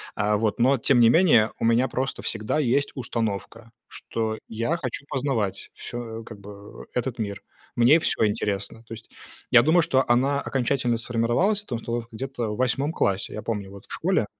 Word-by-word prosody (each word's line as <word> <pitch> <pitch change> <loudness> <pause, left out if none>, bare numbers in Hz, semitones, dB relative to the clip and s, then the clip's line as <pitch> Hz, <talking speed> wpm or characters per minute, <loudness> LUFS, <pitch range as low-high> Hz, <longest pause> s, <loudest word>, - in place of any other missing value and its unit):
А, 105 0 +1
вот, 110 0 -1
но 130 +3 +4
тем 130 +1 +3
не 115 -1 +7
менее, 120 -8 +5
у - - 0
меня 115 +3 +3
просто 130 +2 -2
всегда 110 +6 -1
есть 140 0 +1
установка, 115 -2 -3 0.2
что 110 -1 -4
я 115 +9 -1
хочу 140 -2 -5
познавать 125 -7 -2
всё, 115 -2 -7
как 110 -3 -10
бы, 100 0 -12
этот 125 0 -2
мир, 100 -3 -4 0.3
мне 125 +7 +6
всё 155 - +1
интересно. 105 +1 -3
То - - -8
есть 115 0 -11 0.4
я 120 - +8
думаю, 160 +7 +4
что 135 -3 +2
она 135 +4 +2
окончательно 125 -2 0
сформировалась, 120 - 0
эта 125 - -4
установка, 115 0 -4
где-то 120 -1 -4
в - - -7
8 130 +4 0
классе, 100 - 0
я 110 - -5
помню, 105 -4 -4
вот, 100 0 -12
в - - -9
школе 180 - +1
120 Hz, 180 wpm, -25 LUFS, 110-135 Hz, 0.4 s, я